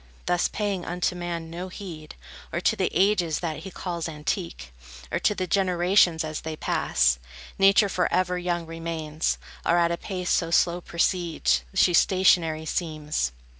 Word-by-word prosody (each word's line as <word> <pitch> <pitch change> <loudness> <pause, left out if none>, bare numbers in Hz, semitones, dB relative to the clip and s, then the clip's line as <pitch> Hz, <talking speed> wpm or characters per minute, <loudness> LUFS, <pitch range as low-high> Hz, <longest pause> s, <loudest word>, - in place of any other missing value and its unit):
Thus, 175 -1 +2
paying 200 -4 -2
unto 180 +1 -1
man 170 -2 -5
no 175 +2 -5
heed, 175 -5 -9 0.4
Or - - -1
to - - +2
the - - 0
ages 185 -5 +2
that 160 -3 -3
he 170 +5 -8
calls 170 -2 -4
antique, 150 - -4 0.4
Or - - 0
to 210 - +1
the 185 - -2
generations 180 -2 +3
as 155 -1 -4
they 160 0 -5
pass, 60 - +1 0.4
Nature 195 +2 +6
forever 180 -1 0
young 175 -1 -2
remains, 165 -1 -3 0.3
Or 170 - +3
at 170 0 +3
a 170 - -1
pace 180 -2 -4
so 165 - +2
slow 170 +1 +2
proceeds, 170 - 0
She 175 - +4
stationary 170 -3 +3
seems. 155 - -2
170 Hz, 155 wpm, -25 LUFS, 160-180 Hz, 0.4 s, Nature